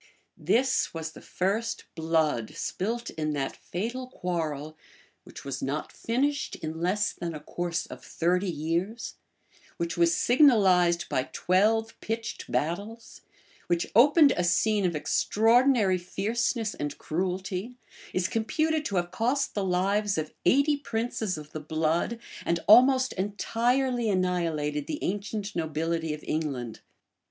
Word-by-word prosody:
This 260 -6 +1
was 160 0 -4
the - - -13
first 215 +5 -2
blood 160 -7 0
spilt 230 +5 -3
in 155 -1 -2
that 140 -2 -2
fatal 240 +8 -4
quarrel 155 - -3 0.5
which - - -11
was 135 -2 -4
not 140 +3 -3
finished 275 +5 -1
in 160 +1 -6
less 190 +4 +1
than 170 -2 -5
a - - -5
course 170 +2 -3
of - - -11
thirty 180 +3 0
years, 170 +8 -2 0.6
which 170 0 -3
was 170 -1 +3
signalized 190 - +4
by 130 - -1
twelve 220 +5 +2
pitched 225 +1 -4
battles, 205 +9 -3 0.5
which 175 -1 0
opened 285 +5 +6
a 180 - 0
scene 205 +3 +2
of 170 - -2
extraordinary 225 - +3
fierceness 220 +4 -1
and 145 -1 -4
cruelty, 185 +6 -3 0.4
is 185 -1 0
computed 310 +8 0
to 200 - -2
have 175 -1 0
cost 245 +8 0
the 205 - -1
lives 195 +2 +1
of 155 -1 -3
eighty 280 - +4
princes 225 - -2
of 150 0 -10
the 155 - -5
blood, 160 +8 0 0.3
and 170 0 0
almost 260 +4 +6
entirely 235 +5 0
annihilated 165 -6 0
the 300 - -3
ancient 205 +1 -3
nobility 160 0 -1
of 150 0 -6
England. 135 -7 -3
185 Hz, 130 wpm, -27 LUFS, 165-230 Hz, 0.6 s, opened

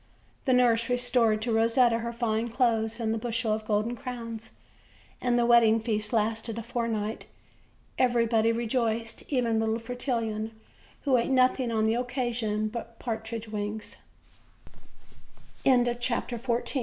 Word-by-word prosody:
The 260 - +3
nurse 235 -2 +3
restored 245 -3 +2
to 235 - -1
Rosetta 230 +1 +3
her 235 0 -3
fine 230 -1 -1
clothes, 230 -2 +1
and 220 -1 0
the 225 - -2
bushel 230 -1 -1
of 215 0 -4
golden 215 +3 0
crowns, 230 -3 -6 0.7
and 245 -1 +2
the 240 - +3
wedding 230 -2 +5
feast 215 -2 -2
lasted 225 0 0
a 230 - -4
fortnight. 230 -2 -2 0.7
Everybody 230 -2 +3
re 235 +1 -2
joiced, 225 -1 -1
even 235 -4 +1
little 220 0 0
Fretillon, 230 -2 -3 0.5
who 270 -3 +3
ate 235 - 0
nothing 255 -1 +3
on 220 -1 +1
the 220 - +2
occa 245 0 -1
sion 215 -2 -1
but 230 +1 -7
partridge 225 -1 -4
wings. 210 0 -4 1.7
OLD, 245 -2 +5
OLD 240 0 -1
FAI 240 0 -1
230 Hz, 145 wpm, -28 LUFS, 220-245 Hz, 1.7 s, wedding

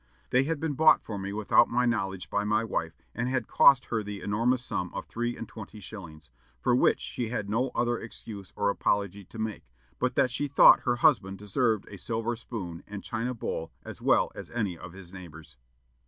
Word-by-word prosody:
They 130 +2 +4
had 160 0 -1
been 160 -1 -1
bought 155 +3 +5
for 105 -3 -5
me 95 +1 -4
without 110 +3 +4
my 125 +1 +1
knowledge 95 -6 -2
by 105 - +1
my 105 +2 +1
wife, 85 -7 -3 0.2
and 125 +2 -2
had 130 0 -1
cost 135 -2 +6
her 110 -2 -1
the 105 -1 -6
enormous 120 +5 +1
sum 90 0 -2
of - - -4
three 120 +1 -3
and 115 - -6
twenty 110 -2 -10
shillings! 85 - -10 0.3
for 120 - +2
which - - +3
she 120 - -4
had 105 -3 -3
no 125 +4 +1
other 120 -1 +1
excuse 105 -4 -8
or 100 - +1
apology 100 -1 -1
to 110 - -13
make, 110 - -4 0.3
but 125 0 0
that 125 - +3
she 145 +3 -1
thought 140 - +8
her 120 - +2
husband 120 -8 +3
deserved 105 +1 0
a 100 - -10
silver 115 +4 -2
spoon 95 -8 -7
and 105 -1 -7
china 120 +2 -3
bowl 80 -7 -4
as - - -9
well - - +3
as - - -9
any 105 -7 -2
of 85 +1 -10
his 95 -1 -11
neighbors." 80 -4 -11
110 Hz, 205 wpm, -28 LUFS, 95-120 Hz, 0.3 s, thought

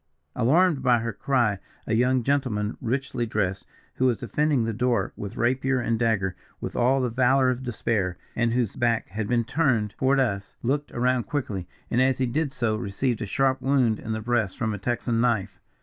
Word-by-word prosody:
"Alarmed 155 +4 +3
by 125 -2 +4
her 115 0 -3
cry, 120 -5 +1 0.3
a - - -1
young 125 +2 +2
gentleman 120 -6 0
richly 130 -1 -2
dressed, 100 -3 -2 0.3
who 130 - +3
was 120 -3 +2
defending 145 +3 +1
the 115 0 -1
door, 120 -3 0
with 100 -1 -7
rapier 130 +2 +1
and 115 -2 0
dagger, 105 -5 +1 0.2
with - - -5
all 130 +3 +3
the 125 - 0
valour 130 +1 +3
of 125 0 -4
despair, 105 -7 -1 0.2
and 120 0 +1
whose 120 -5 0
back 115 -2 0
had 105 +2 -3
been 120 0 +2
turned 115 -6 +1
toward 135 +1 +3
us, 100 -6 -1
looked 145 +4 -1
around 125 0 +1
quickly, 105 -11 -3 0.2
and 120 - +3
as 130 0 +3
he 130 - +1
did 140 +4 -1
so 120 -6 0
received 110 +4 -2
a 110 - -3
sharp 135 +5 +1
wound 130 -5 +2
in 110 - -6
the 110 0 -2
breast 110 -4 0
from 110 -2 -1
a 105 - -5
Texan 120 +1 -1
knife. 115 -6 0
120 Hz, 195 wpm, -25 LUFS, 110-130 Hz, 0.3 s, by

